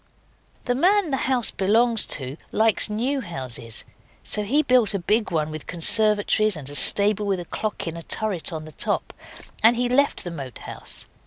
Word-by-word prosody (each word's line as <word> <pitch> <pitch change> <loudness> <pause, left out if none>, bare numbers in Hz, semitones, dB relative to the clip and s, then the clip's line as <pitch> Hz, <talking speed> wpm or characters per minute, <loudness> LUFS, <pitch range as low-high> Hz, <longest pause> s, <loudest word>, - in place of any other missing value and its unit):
The 245 - 0
man 360 +5 +1
the - - +1
house 250 -3 +1
belongs 225 +4 +1
to 135 -1 -4 0.2
likes 220 -1 +2
new 255 +6 -2
houses, 130 - -3 0.4
so 210 - -2
he 270 +9 +1
built 245 -7 +2
a - - +1
big 210 +5 -1
one 155 -3 -2
with 155 -1 -8
conservatories 210 +2 +2
and 140 -3 -10
a - - -8
stable 205 +8 +6
with 195 -2 -1
a 175 - -7
clock 215 +5 -5
in 165 -1 -5
a 170 - -8
turret 195 -1 -1
on 155 -1 -7
the 155 - -11
top, - - -3 0.5
and 230 +2 +6
he 245 +1 -1
left 275 +3 +1
the 175 - -6
Moat 135 -7 -8
House. - - -5
210 Hz, 185 wpm, -22 LUFS, 165-235 Hz, 0.5 s, stable